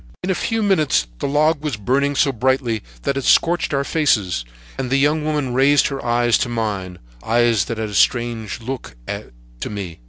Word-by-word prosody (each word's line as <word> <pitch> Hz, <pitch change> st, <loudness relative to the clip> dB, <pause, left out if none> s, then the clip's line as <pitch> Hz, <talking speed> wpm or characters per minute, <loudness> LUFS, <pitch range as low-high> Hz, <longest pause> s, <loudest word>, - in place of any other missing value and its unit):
"In 190 Hz, -, 0 dB
a -, -, +3 dB
few 225 Hz, +4 st, -1 dB
minutes 155 Hz, -, +2 dB
the -, -, -1 dB
log 150 Hz, +2 st, +2 dB
was 145 Hz, -8 st, -2 dB
burning 140 Hz, +7 st, 0 dB
so 140 Hz, -, +3 dB
brightly 125 Hz, -2 st, 0 dB, 0.2 s
that 140 Hz, -, -1 dB
it 135 Hz, -, -2 dB
scorched 175 Hz, +5 st, +3 dB
our 140 Hz, -1 st, +1 dB
faces, 110 Hz, -, +1 dB, 0.4 s
and 130 Hz, -2 st, -2 dB
the 135 Hz, -, +2 dB
young 150 Hz, +3 st, +2 dB
woman 150 Hz, -4 st, -1 dB
raised 140 Hz, +4 st, +4 dB
her 135 Hz, -1 st, -5 dB
eyes 120 Hz, -1 st, +2 dB
to 120 Hz, -, -1 dB
mine—eyes 105 Hz, -, -1 dB
that 115 Hz, -, -4 dB
had 110 Hz, -1 st, -3 dB
a -, -, -8 dB
strange 115 Hz, 0 st, 0 dB
look 125 Hz, -, -6 dB, 0.6 s
to -, -, -4 dB
me. 95 Hz, -6 st, -6 dB
125 Hz, 185 wpm, -20 LUFS, 110-145 Hz, 0.6 s, raised